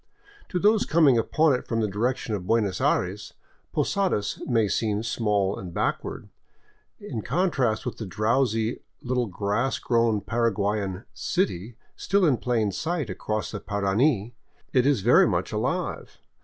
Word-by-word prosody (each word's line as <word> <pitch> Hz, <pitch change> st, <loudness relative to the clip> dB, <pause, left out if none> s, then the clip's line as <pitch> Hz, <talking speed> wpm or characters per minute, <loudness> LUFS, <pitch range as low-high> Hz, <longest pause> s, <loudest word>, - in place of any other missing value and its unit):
To 180 Hz, -, -2 dB
those 210 Hz, +4 st, +4 dB
coming 150 Hz, -7 st, +4 dB
upon 155 Hz, +6 st, +3 dB
it 125 Hz, -, -3 dB
from 115 Hz, -, -1 dB
the 110 Hz, -, +1 dB
direction 115 Hz, +3 st, -1 dB
of 95 Hz, -3 st, -4 dB
Buenos 105 Hz, -4 st, +1 dB
Aires, 95 Hz, +3 st, 0 dB, 0.4 s
Posadas 185 Hz, -, 0 dB
may 115 Hz, -4 st, +2 dB
seem 105 Hz, +1 st, 0 dB
small 105 Hz, -3 st, 0 dB
and 90 Hz, -2 st, -7 dB
backward; -, -, -2 dB, 0.7 s
in 110 Hz, -, -5 dB
contrast 135 Hz, -, 0 dB
with -, -, -4 dB
the 110 Hz, -, -6 dB
drowsy, 110 Hz, +3 st, 0 dB, 0.2 s
little 125 Hz, -1 st, 0 dB
grass 105 Hz, +7 st, -1 dB
grown 115 Hz, -3 st, +1 dB
Para 115 Hz, +2 st, +1 dB
guayan 100 Hz, 0 st, -2 dB
" -, -, -41 dB, 0.2 s
city 120 Hz, -, -1 dB
" -, -, -39 dB
still 195 Hz, -1 st, +1 dB
in 140 Hz, -6 st, +3 dB
plain 115 Hz, -5 st, 0 dB
sight 155 Hz, -, -2 dB
across 105 Hz, +3 st, -3 dB
the 105 Hz, -, -5 dB
Parana, 105 Hz, +4 st, +1 dB, 0.4 s
it 130 Hz, 0 st, +4 dB
is 140 Hz, -8 st, +2 dB
very 120 Hz, +6 st, +5 dB
much -, -, -1 dB
alive. -, -, -3 dB
115 Hz, 155 wpm, -25 LUFS, 105-130 Hz, 0.7 s, very